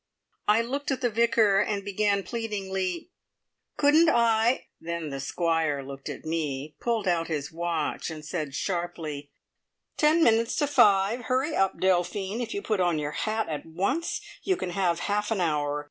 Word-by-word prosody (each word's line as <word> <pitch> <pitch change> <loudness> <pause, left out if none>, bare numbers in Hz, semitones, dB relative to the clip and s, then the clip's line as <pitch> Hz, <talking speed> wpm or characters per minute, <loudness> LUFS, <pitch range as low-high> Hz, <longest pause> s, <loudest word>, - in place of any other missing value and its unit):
I 215 +2 +4
looked 275 +4 -3
at 270 -1 -1
the 245 -2 +1
Vicar, 220 -3 +3
and 205 -1 -1
began 200 0 +1
pleadingly, 190 - -3 0.7
"Couldn't 305 +3 +5
I 235 -1 +3
"; - - -53
then 170 -2 -4
the 135 - -4
Squire 160 -1 0
looked 135 0 -8
at - - -7
me, 150 -3 -3
pulled 230 -4 -1
out 170 -2 +1
his 145 -3 -3
watch, 165 -2 -2
and 155 -1 -8
said 155 -4 -4
sharply: 165 -4 -3 0.7
"Ten 310 +2 +4
minutes 230 -2 +3
to 290 - +2
five. 230 -4 +3
Hurry 265 +6 0
up, 195 -1 +1
Delphine! 190 +4 0
If 240 - -4
you 405 0 -3
put 215 -3 0
on 175 -3 +2
your 150 -1 -2
hat 220 +6 -1
at 150 -2 -4
once 200 - -1 0.2
you 375 -2 0
can 180 - -4
have 175 -2 0
half 210 0 -1
an 220 -3 0
hour. 150 -4 0
195 Hz, 170 wpm, -27 LUFS, 165-230 Hz, 0.7 s, Couldn't